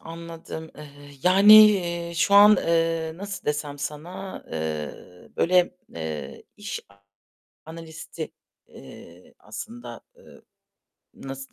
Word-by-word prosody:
anladım. 165 -1 -9
Eee, 150 -1 -11 0.3
yani, 195 +4 +7 0.2
eee, 170 -3 -3
şu 195 +4 +2
an, 210 +1 +8
eee, 165 -1 0
nasıl 200 +1 -7
desem 145 -1 -3
sana? 160 +7 -7
Eee, 80 -2 -3 0.5
böyle, 180 0 +3 0.2
eee, 80 -4 -6
iş 205 -1 -6 0.9
analisti, 160 0 -9 0.4
eee, 85 +2 -15
aslında, 120 0 -9 0.2
eee, - - -18 0.7
nasıl 135 0 -9
165 Hz, 100 wpm, -24 LUFS, 135-180 Hz, 0.9 s, an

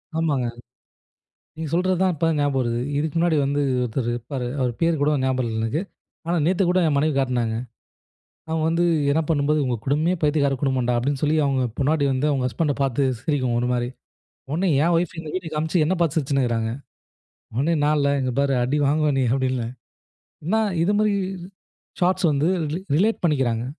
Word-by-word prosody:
ஆமாங்க. 145 -6 0 1.1
நீங்க 160 -1 -4
சொல்லுறது 185 +2 +2
தான் 190 -1 +3
இப்ப 165 +1 0
ஞாபகம் 145 -1 +1
வருது. 120 -1 -1 0.2
இதுக்கு 155 +1 -2
முன்னாடி 165 -1 +2
வந்து 140 +1 0 0.2
ஒருத்தர் 120 0 -2
இருப்பாரு. 120 +2 -4
அவர் 125 -2 +1
பெயர் 165 -3 +1
கூட 145 +1 +3
ஞாபகம் 130 -2 0
இல்ல 110 - -3
எனக்கு. 120 +10 -1 0.4
ஆனா, 170 +1 0
நேத்து 185 +2 +2
கூட 185 +1 +3
என் 145 - +1
மனைவி 155 +2 +2
காட்டுனாங்க. 125 -4 0 0.9
அவங்க 160 0 -1
வந்து 170 +1 +1 0.3
என்ன 160 - +2
பண்ணும்போது, 150 -1 +2
உங்க 125 -2 -1
குடும்பமே 155 +6 +1
பைத்தியக்கார 145 -2 +2
குடும்பம்டா, 130 -3 +1
அப்டீன்னு 135 +3 -2
சொல்லி 150 +1 +2
அவங்க 135 -2 +1 0.2
பொண்டாட்டி 145 +1 +2
வந்து 130 +3 0
அவங்க 135 -3 0
ஹஸ்பண்ட்ட 145 +3 -1
பாத்து 135 0 0 0.2
சிரிக்கும் 130 -5 0
ஒரு 120 +1 0
மாரி. 120 0 -1 0.6
உடனே 175 +5 +1
என் 170 +1 +2
ஒய்ஃப் 170 0 0
இந்த 160 -2 -7
வீடியோ 180 -3 -4
காமிச்சி 160 +3 0
என்னை 180 +5 +1
பாத்து 165 -5 +1
சிரிச்சுனு 140 -2 +1
இருக்கறாங்க. 115 -2 -1 0.8
உடனே, 140 +8 +1
"நான் 150 +1 +3
இல்ல 140 -1 +2
இங்க 130 -1 -1
பாரு 140 0 +2
அடி 130 +4 0
வாங்குவா 150 +1 +2
நீ!" - - +2
அப்டீன்னேன். 130 -3 -1 0.7
என்னா 215 +7 +2 0.2
இது 190 - +2
மாரி 215 -1 +2 0.9
ஷாட்ஸ் 185 +1 +2
வந்து 145 +2 +1 0.2
ரிலே 165 - -2 0.2
ரிலேட் 215 +6 +1
பண்ணிக்குறாங்க. 130 -8 +1
145 Hz, 175 wpm, -23 LUFS, 130-160 Hz, 1.1 s, தான்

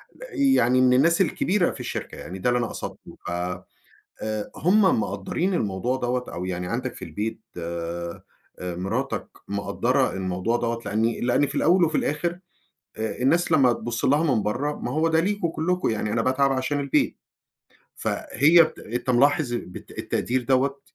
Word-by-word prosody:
ل - - -9 0.2
يعني 130 +1 +4
من 125 0 +5
الناس 170 +8 +4
الكبيرة 185 +2 +1
في - - -10
الشركة - - -5
يعني، 95 +2 -7
ده 125 - +1
اللي 125 - +2
أنا 115 - 0
قصدته، - - -8
ف - - -3 0.9
آآ، 110 -1 -3
هُم 190 - +4
مقدّرين 135 - -2
الموضوع 110 - -1
دَوّة 125 0 -1
أو 90 - -4
يعني 90 -1 -3
عندك 125 +6 -3
في - - -8
البيت 105 +8 -4 0.2
آآ، 85 0 -5 0.4
مراتك 95 +9 -3 0.2
مقدّرة 100 0 0
الموضوع 95 +4 -1
دَوّة؟ 115 -1 -2
لإن 110 +3 +1
لإن 140 +3 +3
في 140 - -7
الأول 175 +4 +4
وفي 155 -1 -1
الآخر 170 +4 -1 0.6
آآ، 110 -1 -3
الناس 170 +6 +2
لمّا 130 -6 +5
تبُصّ 115 +1 -3
لها 145 +4 +3
من 105 - +1
برّا، 130 +8 -1
ما 125 - -4
هو 160 +3 +2
ده 160 0 +3
ليكم 200 0 0
كلكم 180 +1 0
يعني 105 -1 -1
أنا 115 - +2
باتعب 135 +2 +2
عشان 135 +2 -1
البيت، 140 -1 +1 0.8
فهي 165 +4 +4
ت - - -16
أنت 120 +3 -3
ملاحظ 140 +1 +3
بت 90 -6 -7
التقدير 125 +1 -1
دَوّة؟ 135 +2 +1
125 Hz, 165 wpm, -25 LUFS, 105-155 Hz, 0.9 s, من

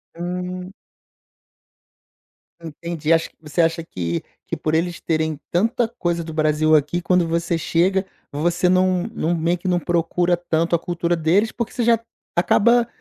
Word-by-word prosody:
Hum. 180 +2 -5 1.9
Entendi, 165 0 -4
acho 165 0 +3
que - - -34
você 150 +2 0
acha 165 0 +1
que 85 - -3 0.2
que - - -3
por 155 0 -1
eles 170 +1 -1
terem 160 -2 -1
tanta 225 +6 +1
coisa 175 -7 -2
do 160 - -7
Brasil 155 0 +3
aqui 150 +4 +1
quando 180 -1 +2
você 170 +1 0
chega, 185 +4 +1 0.3
você 175 +5 +1
não 185 -1 +3
não, 170 -4 0
meio 170 +2 +1
que, 180 - -7
não 180 -1 +2
procura 175 +1 +1
tanto 170 0 0
a - - 0
cultura 175 0 -1
deles, 175 +7 +2
porque 235 -1 -4
você 245 - -1
já 230 -1 +4 0.4
acaba 235 +7 +4
170 Hz, 155 wpm, -21 LUFS, 160-180 Hz, 1.9 s, já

